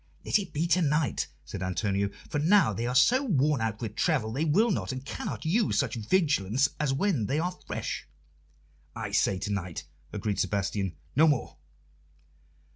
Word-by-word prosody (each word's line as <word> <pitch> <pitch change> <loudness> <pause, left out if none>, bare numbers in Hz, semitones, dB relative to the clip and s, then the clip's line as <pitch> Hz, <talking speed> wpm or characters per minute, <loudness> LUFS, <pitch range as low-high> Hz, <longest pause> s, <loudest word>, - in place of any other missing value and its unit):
"Let - - +3
it 190 -3 -6
be 155 +3 -1
to 175 +2 +3
night," 150 -1 +1 0.2
said - - -7
Antonio, 100 +2 0 0.2
"for 145 - -2
now 170 - +4
they 115 +5 -2
are 125 - -2
so 245 - +5
worn 150 - +2
out 110 0 -2
with 110 -2 -4
travel 135 -10 +1
they 145 +6 0
will 205 +10 +3
not 180 - -1
and 130 +1 -6
cannot - - -5
use 205 +7 +2
such 130 -6 +1
vigilance 135 - +1
as 150 -2 +1
when 140 - +1
they 140 - 0
are 180 +3 -1
fresh." - - -4 0.9
"I 110 -3 -4
say 100 -1 +2
to 100 +2 -4
night," 90 -5 -4 0.3
agreed 105 -1 -2
Sebastian. 100 -3 -1 0.2
"No 155 +4 +6
more." 145 -5 0
135 Hz, 175 wpm, -28 LUFS, 105-160 Hz, 0.9 s, No